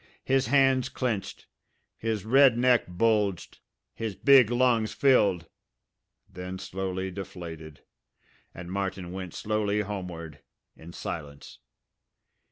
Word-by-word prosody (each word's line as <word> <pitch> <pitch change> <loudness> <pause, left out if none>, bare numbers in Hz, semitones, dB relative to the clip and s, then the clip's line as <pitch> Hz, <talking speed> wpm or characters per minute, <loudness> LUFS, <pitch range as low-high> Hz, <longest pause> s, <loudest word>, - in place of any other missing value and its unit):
His 135 -3 +1
hands 135 -1 +3
clenched. 115 -6 -3 0.5
His 110 -3 -3
red 130 +1 +5
neck 125 -1 +3
bulged. 100 0 0 0.3
His 110 -3 -4
big 135 -3 +6
lungs 120 -3 +2
filled 100 - +3 0.8
then 90 +1 -7
slowly 95 0 -4
deflated; 85 -5 -9 0.7
and 85 0 -9
Martin 95 -2 -3
went 95 -2 -7
slowly 105 -1 -1
homeward, 90 -7 -6 0.4
in 85 +2 -12
silence. 75 -4 -8
100 Hz, 100 wpm, -27 LUFS, 90-115 Hz, 0.8 s, big